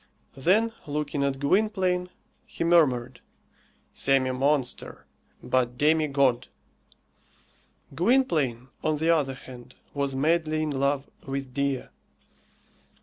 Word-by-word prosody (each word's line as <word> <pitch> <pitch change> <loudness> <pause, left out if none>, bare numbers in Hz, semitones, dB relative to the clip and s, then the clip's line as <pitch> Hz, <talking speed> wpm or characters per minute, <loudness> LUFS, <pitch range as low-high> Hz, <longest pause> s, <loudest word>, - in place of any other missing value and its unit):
Then, 205 +12 +2
looking 145 -1 -2
at 140 -1 0
Gwynplaine, 185 +3 +1 0.4
he - - -4
murmured, 130 -8 +2 0.7
Semi 135 -1 +2
monster, 135 0 -1 0.4
but 125 -1 0
demi 155 +2 +3
god. 135 -3 +1 1.5
Gwynplaine, 155 - +1
on 155 -1 +1
the 160 +2 +2
other 145 -5 +1
hand, 125 -1 -13 0.2
was 140 -1 -1
madly 155 +2 +1
in 155 - -2
love 140 0 0 0.2
with 135 -1 -4
Dea. 140 -1 -1
140 Hz, 100 wpm, -26 LUFS, 130-160 Hz, 1.5 s, demi